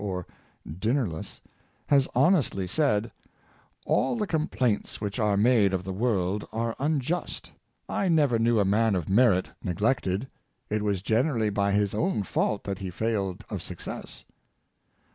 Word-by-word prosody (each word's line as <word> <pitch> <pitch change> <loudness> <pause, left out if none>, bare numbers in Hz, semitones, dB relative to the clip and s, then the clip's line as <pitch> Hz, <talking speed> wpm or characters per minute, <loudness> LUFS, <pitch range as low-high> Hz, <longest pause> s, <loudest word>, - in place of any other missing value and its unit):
^ - - -6
or 90 -3 -3 0.4
Dinnerless, 100 - -2 0.4
has 140 -2 +3
honestly 150 - +3
said, 110 - +1 0.4
*' - - -34
All 135 - +2
the 215 - 0
complaints 145 - -1
which 105 +2 -4
are 105 -2 +2
made 105 -3 +4
of 90 - -3
the 95 0 -4
world 100 -2 0
are 115 0 -2
unjust; 150 +4 -2 0.4
I 195 - -1
never 145 -9 +3
knew 115 0 +3
a 100 - +3
man 105 +2 +2
of 85 -4 -2
merit 100 -2 +3
neglected; 100 +3 0 0.4
it 105 0 0
was 100 -3 -1
generally 115 -1 +1
by 100 0 +1
his 100 -1 +1
own 135 - 0
fault 100 +1 -1
that 100 -1 -4
he 95 -2 -4
failed 100 -1 -2
of - - -3
success." - - -8
105 Hz, 150 wpm, -27 LUFS, 100-125 Hz, 0.4 s, made